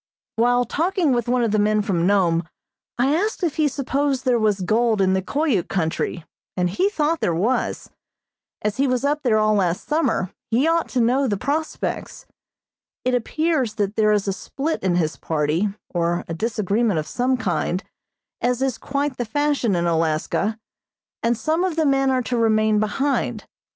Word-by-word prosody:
While 245 Hz, +2 st, +3 dB
talking 345 Hz, 0 st, 0 dB
with 240 Hz, -2 st, 0 dB
one 245 Hz, 0 st, +2 dB
of 230 Hz, -, +1 dB
the 215 Hz, -, +2 dB
men 210 Hz, 0 st, +2 dB
from 180 Hz, -5 st, 0 dB
Nome 175 Hz, -4 st, +2 dB, 0.5 s
I 265 Hz, +4 st, +2 dB
asked 410 Hz, +3 st, -1 dB
if 335 Hz, -3 st, -1 dB
he 310 Hz, -1 st, +3 dB
supposed 275 Hz, 0 st, -1 dB
there 245 Hz, -2 st, +3 dB
was 210 Hz, -3 st, +1 dB
gold 220 Hz, +3 st, +2 dB
in 190 Hz, -1 st, +3 dB
the 190 Hz, -, +1 dB
Koyuk 275 Hz, -, 0 dB
country, 165 Hz, -1 st, -2 dB, 0.3 s
and 180 Hz, -1 st, +1 dB
he 375 Hz, -, +1 dB
thought 320 Hz, -4 st, 0 dB
there 170 Hz, -, 0 dB
was. 220 Hz, +10 st, -1 dB, 0.7 s
As 210 Hz, -1 st, -1 dB
he 275 Hz, +1 st, +2 dB
was 255 Hz, +1 st, 0 dB
up 295 Hz, +1 st, +1 dB
there 235 Hz, -6 st, +2 dB
all 215 Hz, 0 st, +3 dB
last 185 Hz, -4 st, 0 dB
summer, 300 Hz, -, 0 dB, 0.2 s
he 245 Hz, +7 st, +2 dB
ought 330 Hz, 0 st, +1 dB
to 255 Hz, -, -1 dB
know 260 Hz, +4 st, +2 dB
the 205 Hz, -4 st, 0 dB
prospects. 300 Hz, +8 st, -3 dB, 0.8 s
It 255 Hz, -, +1 dB
appears 260 Hz, -1 st, 0 dB
that 205 Hz, 0 st, -1 dB
there 215 Hz, -1 st, +3 dB
is 210 Hz, -1 st, +1 dB
a 195 Hz, -, +1 dB
split 290 Hz, +10 st, -3 dB
in 185 Hz, -2 st, +1 dB
his 160 Hz, -3 st, 0 dB
party, 160 Hz, +5 st, 0 dB, 0.2 s
or 175 Hz, 0 st, 0 dB
a 165 Hz, -, -4 dB
disagreement 210 Hz, +1 st, 0 dB
of 155 Hz, -, -1 dB
some 255 Hz, +6 st, 0 dB
kind, 185 Hz, -2 st, -1 dB, 0.6 s
as 250 Hz, +1 st, +1 dB
is 265 Hz, -4 st, -1 dB
quite 280 Hz, -1 st, -2 dB
the 245 Hz, -, -1 dB
fashion 280 Hz, -3 st, 0 dB
in 170 Hz, 0 st, 0 dB
Alaska, 165 Hz, +6 st, 0 dB, 0.6 s
and 235 Hz, 0 st, +1 dB
some 320 Hz, +7 st, 0 dB
of 370 Hz, -4 st, -1 dB
the 320 Hz, -1 st, +1 dB
men 270 Hz, -1 st, +3 dB
are 255 Hz, -1 st, +1 dB
to 245 Hz, +1 st, -2 dB
remain 215 Hz, -2 st, +3 dB
behind. 265 Hz, +7 st, -1 dB
230 Hz, 180 wpm, -22 LUFS, 195-275 Hz, 0.8 s, While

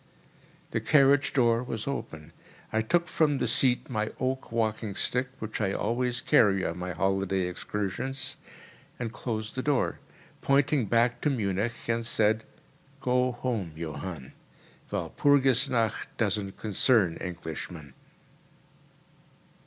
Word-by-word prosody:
The -, -, 0 dB
carriage 140 Hz, -1 st, +4 dB
door 120 Hz, -3 st, +3 dB
was 115 Hz, -3 st, -4 dB
open. 80 Hz, -, -5 dB, 0.4 s
I 110 Hz, -, +2 dB
took 170 Hz, +10 st, +1 dB
from 150 Hz, -3 st, +2 dB
the -, -, 0 dB
seat 125 Hz, -2 st, +3 dB
my 110 Hz, -3 st, -2 dB
oak 130 Hz, -1 st, -2 dB
walking 110 Hz, -3 st, -1 dB
stick—which 125 Hz, -3 st, -2 dB
I 100 Hz, -2 st, +1 dB
always 120 Hz, +2 st, -1 dB
carry 95 Hz, -4 st, +4 dB
on 85 Hz, +1 st, -3 dB
my 90 Hz, 0 st, -3 dB
holiday 95 Hz, 0 st, 0 dB
excursions—and 105 Hz, +5 st, -5 dB
closed 110 Hz, -1 st, -4 dB
the 130 Hz, -, -2 dB
door, 140 Hz, -1 st, 0 dB, 0.4 s
pointing 140 Hz, -3 st, +2 dB
back 115 Hz, +3 st, +2 dB
to 150 Hz, -, +2 dB
Munich, 110 Hz, -2 st, -2 dB
and 115 Hz, 0 st, 0 dB
said, 110 Hz, -1 st, +1 dB, 0.5 s
"Go 125 Hz, -1 st, +1 dB
home, 115 Hz, -9 st, -3 dB
Johann—Walpurgis 95 Hz, -, -1 dB
nacht 115 Hz, -3 st, 0 dB
doesn't 100 Hz, -3 st, -1 dB
concern 105 Hz, -4 st, +2 dB
Englishmen." 80 Hz, -4 st, -6 dB
115 Hz, 115 wpm, -28 LUFS, 95-130 Hz, 0.5 s, carriage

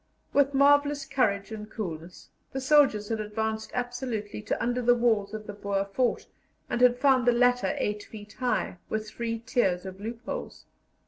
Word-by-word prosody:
With 280 Hz, 0 st, +3 dB
marvellous 285 Hz, +1 st, +4 dB
courage 220 Hz, -7 st, 0 dB
and 210 Hz, -1 st, -7 dB
coolness, 175 Hz, -5 st, -7 dB, 0.2 s
the 265 Hz, -, -2 dB
soldiers 265 Hz, -7 st, +4 dB
had 225 Hz, -1 st, -1 dB
advanced 220 Hz, +1 st, -3 dB
absolutely 245 Hz, -4 st, -3 dB
to 210 Hz, -, -2 dB
under 245 Hz, +1 st, 0 dB
the 245 Hz, 0 st, +4 dB
walls 220 Hz, -4 st, +1 dB
of 215 Hz, -1 st, -6 dB
the 205 Hz, -, -7 dB
Boer 200 Hz, -1 st, -2 dB
fort, 240 Hz, +5 st, 0 dB, 0.5 s
and 245 Hz, -, 0 dB
had 245 Hz, -1 st, +6 dB
found 255 Hz, -2 st, +3 dB
the -, -, +7 dB
latter 245 Hz, -4 st, +2 dB
8 210 Hz, 0 st, -1 dB
feet 205 Hz, -1 st, -11 dB
high, 245 Hz, -7 st, -1 dB
with 215 Hz, 0 st, -2 dB
three 230 Hz, +1 st, -3 dB
tiers 210 Hz, -6 st, 0 dB
of 190 Hz, +1 st, -8 dB
loopholes. 235 Hz, -, -6 dB
230 Hz, 170 wpm, -28 LUFS, 210-250 Hz, 0.5 s, the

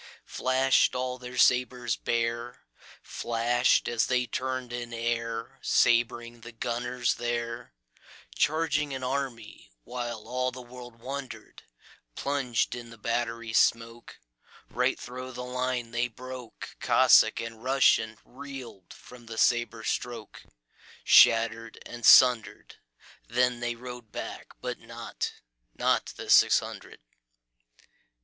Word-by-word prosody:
Flash'd 130 Hz, 0 st, +2 dB
all 125 Hz, 0 st, -3 dB
their 125 Hz, 0 st, -8 dB
sabres 125 Hz, -2 st, +2 dB
bare, 120 Hz, +1 st, -2 dB, 0.4 s
Flash'd 120 Hz, +2 st, +1 dB
as 115 Hz, -1 st, +1 dB
they 125 Hz, -1 st, +1 dB
turn'd 130 Hz, +1 st, -4 dB
in 120 Hz, -1 st, -5 dB
airSabring 120 Hz, 0 st, 0 dB
the 120 Hz, +1 st, -10 dB
gunners 120 Hz, +1 st, -2 dB
there, 120 Hz, -, -4 dB, 0.6 s
Charging 150 Hz, -2 st, 0 dB
an 130 Hz, -, -6 dB
army, 125 Hz, -4 st, -4 dB, 0.2 s
whileAll 125 Hz, +1 st, -3 dB
the 130 Hz, -, -8 dB
world 120 Hz, -1 st, -12 dB
wonder'd:Plunged 130 Hz, -, -5 dB
in 120 Hz, -1 st, -8 dB
the 115 Hz, -, -13 dB
battery 115 Hz, 0 st, -3 dB
smokeRight 115 Hz, -, -1 dB
thro' 130 Hz, +1 st, -8 dB
the 125 Hz, 0 st, -7 dB
line 125 Hz, -1 st, -2 dB
they 120 Hz, +1 st, 0 dB
broke; 125 Hz, 0 st, -10 dB
Cossack -, -, +5 dB
and 115 Hz, -1 st, -6 dB
RussianReel'd 130 Hz, -2 st, -1 dB
from 120 Hz, -2 st, -15 dB
the 115 Hz, 0 st, -8 dB
sabre 120 Hz, -2 st, +1 dB
strokeShatter'd 115 Hz, -, +1 dB
and 120 Hz, 0 st, -9 dB
sunder'd. 125 Hz, -3 st, +5 dB, 0.5 s
Then 125 Hz, +1 st, +1 dB
they 120 Hz, 0 st, -2 dB
rode 125 Hz, -2 st, -10 dB
back, -, -, -7 dB
but -, -, -4 dB
notNot -, -, -4 dB
the -, -, -4 dB
six -, -, +7 dB
hundred. -, -, -10 dB
120 Hz, 100 wpm, -28 LUFS, 115-125 Hz, 0.6 s, six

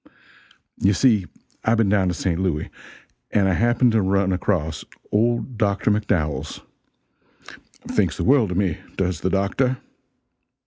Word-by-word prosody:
You 100 Hz, +2 st, +3 dB
see, 105 Hz, -5 st, +3 dB, 0.4 s
I've 115 Hz, +1 st, +2 dB
been 110 Hz, -2 st, +3 dB
down 100 Hz, -2 st, +2 dB
to 90 Hz, -, -1 dB
St. 85 Hz, -1 st, -1 dB
Louis, 90 Hz, -5 st, -2 dB, 0.6 s
and 100 Hz, -2 st, +2 dB
I 95 Hz, -, +2 dB
happened 120 Hz, +4 st, +3 dB
to 110 Hz, -1 st, +2 dB
run 95 Hz, 0 st, +1 dB
across 85 Hz, -4 st, -1 dB, 0.3 s
old 120 Hz, +2 st, 0 dB
Dr. 100 Hz, -1 st, +1 dB
McDowells 100 Hz, -8 st, -1 dB, 1.3 s
thinks -, -, 0 dB
the -, -, -2 dB
world 130 Hz, -6 st, +4 dB
of 90 Hz, -, -3 dB
me, 95 Hz, -6 st, 0 dB, 0.2 s
does 90 Hz, -3 st, -1 dB
the 95 Hz, -, 0 dB
doctor. 100 Hz, +7 st, 0 dB
100 Hz, 140 wpm, -22 LUFS, 90-110 Hz, 1.3 s, world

